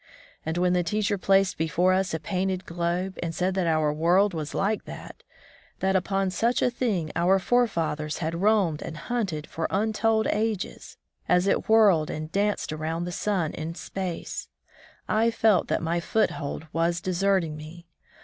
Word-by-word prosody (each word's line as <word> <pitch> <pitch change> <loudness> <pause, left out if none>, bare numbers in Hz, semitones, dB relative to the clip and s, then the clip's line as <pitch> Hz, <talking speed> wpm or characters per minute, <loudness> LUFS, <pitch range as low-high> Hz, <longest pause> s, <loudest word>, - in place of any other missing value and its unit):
And 160 +1 -3
when 180 0 +2
the 180 - +3
teacher 205 +4 0
placed 195 -1 +2
before 175 +3 +2
us 190 0 +1
a 160 - -2
painted 185 +2 -2
globe, 175 +2 -2
and 165 -1 -3
said 185 +3 0
that 185 -2 0
our 155 -2 +2
world 175 +6 +3
was 155 -2 -4
like 205 +2 0
that - - -10 0.3
— - - -28
that 190 0 +1
upon 195 0 0
such 235 +6 +1
a 250 - +2
thing 205 -11 -1
om* 180 +3 +4
forefathers 170 -9 0
had 170 +1 -3
roamed 195 -7 +2
and 155 - -6
hunted 170 -4 -2
for 160 0 -3
untold 220 +2 +1
ages, 215 -2 -3 0.3
as 180 +1 +4
it 200 - 0
whirled 200 -9 +5
and 155 +1 -5
danced 200 -4 0
around 160 +2 -3
the 175 - -4
sun 180 -3 -1
in 165 +2 -5
space 185 -2 -5 0.3
— - - -26
I 230 - +4
felt 220 -5 +3
that - - -1
my 170 +1 0
foothold 170 -5 -1
was 170 +1 +1
deserting 185 -3 0
me. 160 +3 -10
180 Hz, 170 wpm, -26 LUFS, 165-200 Hz, 0.3 s, whirled